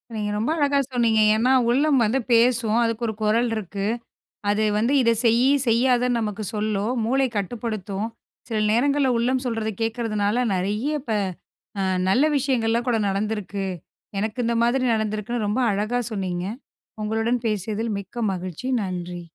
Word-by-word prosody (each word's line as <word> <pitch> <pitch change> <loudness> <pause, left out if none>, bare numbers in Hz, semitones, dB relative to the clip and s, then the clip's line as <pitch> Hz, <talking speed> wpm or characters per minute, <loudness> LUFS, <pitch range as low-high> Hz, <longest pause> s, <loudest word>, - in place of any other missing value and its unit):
நீங்க 210 -1 -2
ரொம்ப 225 +7 -1
அழகா 285 -1 +2
சொன்னீங்க. 230 -3 +3
ஏன்னா 245 +4 +2 0.2
உள்ளம் 275 +1 +3
வந்து 230 +5 +1
பேசும். 235 -1 +3
அதுக்கு 230 +1 -1
ஒரு 220 - -2
குரல் 230 +3 +2
இருக்கு. 200 -1 -4 0.6
அது 210 +1 +2
வந்து 230 +6 +1
இத 230 -2 +4
செய் 230 +1 +4 0.2
செய்யாத 245 +2 +3
நமக்கு 215 -1 -3
சொல்லும் 210 +1 -1
மூளை 265 +3 +2
கட்டுப்படுத்தும். 215 -1 -3 0.4
சில 220 -1 -1
நேரங்கள்ல 275 +3 +2
உள்ளம் 255 +2 +1
சொல்றதை 225 -2 -1
கேக்குறதுனால 225 0 0
நெறைய 210 +10 -1
ப - - -10 0.7
அ - - +1 0.3
நல்ல 255 +9 +4
விஷயங்கள்லாம் 240 -3 0
கூட 235 -2 +2
நடந்துருக்கு. 200 -1 -2 0.5
எனக்கு 220 +3 -3
இந்த 235 - +1
மாதிரி 255 +2 +2
நடந்துருக்கு 215 +1 -2
ரொம்ப 210 +5 0
அழகா 215 +5 0
சொன்னீங்க. 185 -3 -3 0.6
உங்களுடன் 225 +3 0
பேசியதில் 215 +1 -2
மிக்க 215 +4 -6
மகிழ்ச்சி. 185 +7 -5
நன்றி. 180 -1 -5
225 Hz, 140 wpm, -23 LUFS, 210-245 Hz, 0.7 s, இத